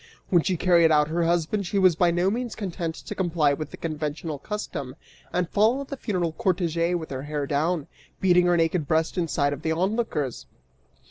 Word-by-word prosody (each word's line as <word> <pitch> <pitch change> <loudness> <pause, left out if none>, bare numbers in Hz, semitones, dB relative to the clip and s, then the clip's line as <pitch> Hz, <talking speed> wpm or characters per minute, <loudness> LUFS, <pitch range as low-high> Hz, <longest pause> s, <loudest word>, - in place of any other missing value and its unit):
When 175 -4 +4
she 185 +1 -1
carried 170 -2 +4
out 150 -1 +4
her 170 +1 0
husband 175 +4 0
she 200 - -1
was 185 -3 +5
by 175 +1 +3
no 175 +3 +1
means 240 +1 -3
content 175 -5 -4
to - - -7
comply 165 -6 +1
with 155 +2 -4
the - - -10
conventional 155 -1 -4
custom 140 -9 -5 0.4
and 180 -1 0
follow 225 +9 +2
the 275 0 -6
funeral 185 -10 -1
cortege 175 -3 0
with 160 -4 -5
her 130 -1 -4
hair 145 0 -3
down, 155 +2 0 0.3
beating 180 -2 +4
her 175 -1 +3
naked 165 -2 +1
breast 160 +1 +1
in 175 -3 0
sight 145 -2 +1
of 145 - -7
the 160 - -1
onlookers! 185 - -1
170 Hz, 195 wpm, -25 LUFS, 155-185 Hz, 0.4 s, was